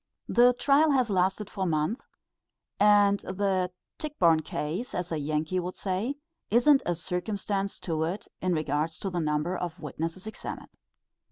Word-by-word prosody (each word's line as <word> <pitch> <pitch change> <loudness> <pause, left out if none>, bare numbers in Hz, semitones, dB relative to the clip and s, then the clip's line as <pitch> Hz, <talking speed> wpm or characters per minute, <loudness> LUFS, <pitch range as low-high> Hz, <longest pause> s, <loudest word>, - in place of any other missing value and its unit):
The 245 +1 +5
trial 285 +5 +4
has 255 -5 +2
lasted 190 +2 +1
for 190 -2 -3
months, 165 - -1 0.7
and 205 -1 +5
the 190 -1 0 0.3
Tichborne 180 - +3
Case, 160 +9 -4
as 180 -1 -3
a 160 - -1
Yankee 155 +4 -1
would 180 +1 -4
say, 200 +8 -2 0.3
isn't 270 +5 +5
a 175 - +1
circumstance 195 +3 -2
to 160 -3 -2
it 185 +6 -4
in 185 -1 +1
regard 155 0 0
to 195 +4 -5
the 175 - -1
number 155 +3 0
of 175 -1 -4
witnesses 165 +4 -5
examined. 220 - -7
185 Hz, 150 wpm, -28 LUFS, 165-210 Hz, 0.7 s, The